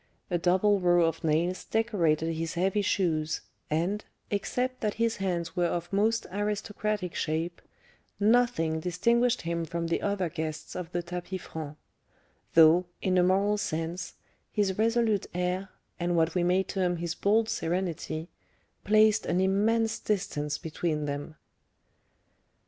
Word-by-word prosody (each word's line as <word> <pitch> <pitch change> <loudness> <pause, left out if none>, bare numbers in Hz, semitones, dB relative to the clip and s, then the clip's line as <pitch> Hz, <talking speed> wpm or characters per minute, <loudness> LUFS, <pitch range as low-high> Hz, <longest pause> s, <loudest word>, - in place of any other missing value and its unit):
A 175 - +1
double 190 +4 +3
row 175 -2 +4
of 165 0 -2
nails 165 +4 +1
decorated 170 -8 +1
his 165 +1 -3
heavy 190 +4 +1
shoes, 160 -6 0 0.3
and, 175 +7 0 0.3
except 250 +5 -1
that 210 -2 -1
his 230 0 0
hands 175 -4 -2
were 175 -1 +2
of 175 +2 -3
most 220 +3 +2
aristocratic 205 -1 -2
shape, 165 +2 -2 0.6
nothing 210 -8 +3
distinguished 235 +9 +1
him 170 0 -1
from 170 +1 -3
the 165 - 0
other 200 -3 0
guests 160 -2 -5
of 180 -2 -5
the 175 -1 -2
tapis 180 +1 -5
franc; 155 -2 -7 0.8
though, 165 +2 +7 0.2
in 185 -1 +2
a - - +6
moral 195 +3 +2
sense, 165 -1 -3 0.4
his 200 -3 +1
resolute 225 -2 +2
air, 180 +2 -1 0.3
and 175 0 0
what 160 0 +2
we 180 - +1
may 180 +2 +3
term 180 -2 -1
his 170 0 -3
bold 215 +4 +2
serenity, 170 -4 -2 0.6
placed 215 +1 +4
an 180 - +1
immense 220 +4 +2
distance 165 -8 -1
between 155 -1 -2
them. 145 +2 -4
180 Hz, 140 wpm, -28 LUFS, 165-205 Hz, 0.8 s, though